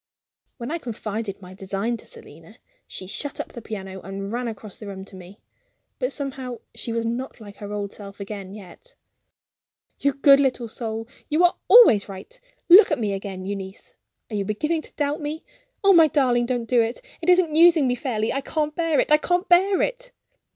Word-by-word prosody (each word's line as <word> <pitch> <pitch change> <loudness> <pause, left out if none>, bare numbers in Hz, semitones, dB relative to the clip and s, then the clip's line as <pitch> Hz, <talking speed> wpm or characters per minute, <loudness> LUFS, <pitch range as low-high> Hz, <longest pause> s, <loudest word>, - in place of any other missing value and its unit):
When 240 +2 -6
I 335 - -2
confided 220 -5 -5
my 180 +1 -11
design 195 +4 -3
to - - -14
Selina, 460 -1 -14 0.3
she 185 - -6
shut 280 +9 -5
up - - -4
the 235 - -8
piano 190 -4 -7
and 195 +2 -6
ran 240 +1 -2
across 215 -3 -8
the 210 - -9
room 190 -1 -7
to 195 - -14
me. 185 +3 -13 0.6
But - - -1
somehow 265 -4 -5
she 235 - -5
was 230 0 -1
not 245 +3 -4
like 205 -2 -12
her 205 -1 -8
old 205 -1 -4
self 200 -1 -11
again, 200 -1 -7
yet. 215 - -14 1.0
"You 280 0 +1
good 275 0 +6
little 255 -3 0
soul, 225 0 -5 0.2
you 310 +4 +2
are 355 - +4
always 235 - +7
right. 425 - -10 0.3
Look 370 +5 +9
at 300 - +1
me 210 -5 -1
again, 195 -1 -6
Euneece. 195 0 -7 0.4
Are - - -3
you 200 - 0
beginning 300 +11 -1
to - - -10
doubt 290 +2 -1
me? 300 +2 -5 0.4
Oh, 395 0 +6
my 330 -3 +7
darling, 250 -5 +2
don't 245 -2 -1
do 245 +1 +2
that! 230 +1 0 0.2
It 335 - -1
isn't 360 -3 +4
using 330 -2 +6
me 250 - +2
fairly. 235 -4 -2
I 275 - -1
can't 300 +1 -2
bear 330 -3 +1
it - - 0
I 300 - +8
can't 355 +4 0
bear 375 +2 +4
it!" - - -4
240 Hz, 200 wpm, -23 LUFS, 205-305 Hz, 1.0 s, Look